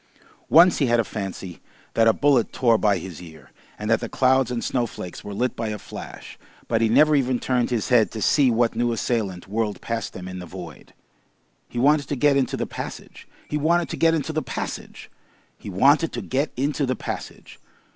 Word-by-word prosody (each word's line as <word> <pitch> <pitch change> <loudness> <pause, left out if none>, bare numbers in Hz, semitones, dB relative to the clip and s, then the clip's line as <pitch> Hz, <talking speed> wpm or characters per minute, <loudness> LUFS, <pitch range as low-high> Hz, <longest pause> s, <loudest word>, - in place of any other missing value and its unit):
Once 175 +2 +6
he 140 - +2
had 120 0 +3
a - - +3
fancy 95 -4 -6 0.3
that 115 0 +3
a - - +7
bullet 135 -1 +2
tore 120 -3 +3
by 105 -2 +2
his 90 -3 -8
ear, 80 -4 -14 0.3
and 105 - -5
that 115 - +4
the 120 - -5
clouds 130 -1 +2
and 120 -1 -3
snowflakes 120 -8 -3
were 105 - -7
lit 120 +5 -1
by 115 - -3
a 105 0 -3
flash, - - -10 0.3
but 115 -1 +1
he 115 - +3
never 150 +6 +5
even 130 -2 +1
turned 125 -1 0
his 120 -2 -1
head 115 -6 +4
to 110 - -7
see 140 +4 +3
what 115 0 +1
new 120 +1 +1
assailant 105 -6 -2
whirled 105 +1 -2
past 115 -2 -4
them 90 0 -8
in 95 0 -6
the 90 - -8
void. - - -11 0.7
He - - -8
wanted 145 +3 +3
to 145 - -2
get 145 +2 +3
into 135 -3 0
the - - -2
passage! - - -8 0.2
He 150 - -2
wanted 170 +3 +2
to - - -4
get 165 0 +3
into 160 0 -3
the 155 - 0
passage! 130 - -6 0.4
He - - -10
wanted 140 - +3
to - - -3
get 140 +4 -1
into 140 +1 0
the 130 - 0
passage! - - -7
120 Hz, 205 wpm, -23 LUFS, 105-140 Hz, 0.7 s, a